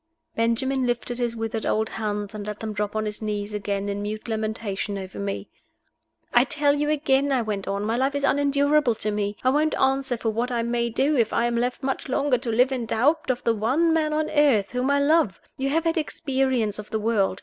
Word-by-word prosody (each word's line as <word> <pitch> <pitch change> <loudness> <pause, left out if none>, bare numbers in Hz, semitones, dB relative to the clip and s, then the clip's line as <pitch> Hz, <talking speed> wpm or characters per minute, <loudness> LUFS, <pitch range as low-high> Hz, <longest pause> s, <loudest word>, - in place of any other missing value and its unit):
Benjamin 250 +3 +1
lifted 240 0 -2
his 240 -1 -1
withered 225 0 -3
old 220 +1 0
hands, 210 -2 -3
and 210 -1 -6
let 210 0 -5
them 220 -1 -4
drop 210 0 -3
on 215 0 0
his 210 0 -5
knees 210 -1 -3
again 200 -1 -2
in 200 0 -3
mute 215 +2 -5
lamentation 215 -2 -3
over 190 -1 -7
me. 200 0 -3 0.9
"I 240 - +6
tell 285 +1 +2
you 295 +1 0
again," 280 -2 +2
I 255 -3 +2
went 205 -3 -3
on, 200 +1 -1
"my 225 +2 0
life 270 +2 +1
is 285 - -2
unendurable 285 -2 +3
to 215 0 -2
me. 205 0 -2
I 255 - +4
won't 305 +3 +1
answer 265 -2 +1
for 225 -1 -1
what 235 +3 -1
I 235 -1 0
may 235 0 0
do 275 +6 +1
if 230 -4 +2
I 235 - +2
am 240 0 0
left 245 +3 -1
much 270 0 -2
longer 260 -1 +1
to 240 -1 -3
live 250 +4 +3
in 245 -3 -2
doubt 290 +9 +1
of 250 -1 0
the 230 - +3
one 265 +10 +2
man 310 -1 +1
on 305 0 0
earth 285 -10 +3
whom 250 +2 0
I 280 0 +3
love. 285 - +2 0.2
You 270 +1 -1
have 320 +3 +1
had 330 0 +1
experience 260 -8 -1
of 210 - -8
the 220 - -1
world. 210 -3 +1
235 Hz, 225 wpm, -24 LUFS, 215-275 Hz, 0.9 s, I